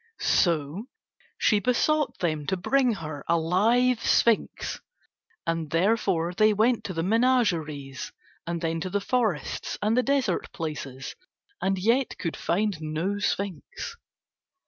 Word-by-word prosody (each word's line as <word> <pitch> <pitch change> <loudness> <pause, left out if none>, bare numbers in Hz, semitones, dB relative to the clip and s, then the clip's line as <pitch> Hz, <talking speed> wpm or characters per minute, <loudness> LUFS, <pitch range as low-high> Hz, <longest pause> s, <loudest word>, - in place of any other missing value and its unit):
So 170 - +1 0.5
she 210 - +3
besought 290 +7 +1
them 155 -4 -1
to 190 - 0
bring 255 +6 +2
her 155 -5 -6
a 170 - +3
live 225 +9 +2
sphinx; 230 -2 +1 0.6
and 165 -2 -1
therefore 180 -1 +1
they 215 +3 +4
went 225 +3 +2
to 185 - -3
the 165 - -1
menageries, 175 - +1 0.4
and 170 -1 -2
then 165 -1 -1
to 185 - -3
the 205 +2 0
forests 215 -7 -1
and 215 +2 +1
the 250 - +4
desert 265 -8 0
places, 140 -4 -5 0.5
and 195 0 +1
yet 230 +7 +1
could 165 -4 -3
find 195 -2 -1
no 160 +6 -2
sphinx. 200 - -3
190 Hz, 130 wpm, -26 LUFS, 165-230 Hz, 0.6 s, they